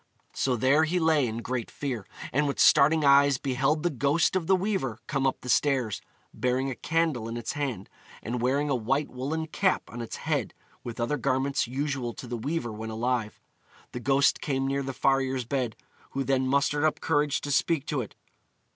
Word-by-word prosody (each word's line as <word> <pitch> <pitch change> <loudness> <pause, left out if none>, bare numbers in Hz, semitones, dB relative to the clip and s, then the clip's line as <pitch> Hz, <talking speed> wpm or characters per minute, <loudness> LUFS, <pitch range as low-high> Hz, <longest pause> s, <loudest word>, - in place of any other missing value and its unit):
So 130 -2 0
there 135 +6 +3
he 170 +3 0
lay 160 -5 +3
in 115 +1 -4
great 125 -2 -3
fear, 125 -8 -4 0.3
and 145 +3 +2
with 140 - -2
starting 150 +2 +5
eyes 140 0 +6
beheld 135 +3 0
the 175 - +1
ghost 145 +7 +1
of 175 -4 0
the 190 - +5
weaver 185 - -1
come 135 -1 0
up 130 - -2
the - - -9
stairs, 125 -5 +1 0.3
bearing 130 +2 0
a - - -5
candle 155 -8 0
in 115 - -4
its 115 -1 -3
hand, 130 -10 -3 0.4
and 120 +2 -3
wearing 140 +4 +1
a 140 - +1
white 130 +5 -1
woollen 145 +6 -3
cap 190 +4 +1
on 120 - -6
its 115 - -5
head, - - -2 0.3
with 120 -1 -7
other 120 +5 0
garments 130 +1 0
usual 130 -2 -3
to - - -8
the 120 0 -4
weaver 120 +1 -2
when 110 +1 -6
alive. 115 0 -2 0.5
The 125 - -5
ghost 135 +2 +3
came 135 -2 -1
near 135 +1 0
the 135 0 -3
farrier's 135 -1 +1
bed, 125 -3 -2 0.4
who 135 - -1
then 130 0 +1
mustered 140 +2 +1
up 155 - +2
courage 145 -3 +1
to 145 - -4
speak 145 +1 +1
to 145 -4 -1
it. 110 - -9
135 Hz, 195 wpm, -27 LUFS, 125-145 Hz, 0.5 s, eyes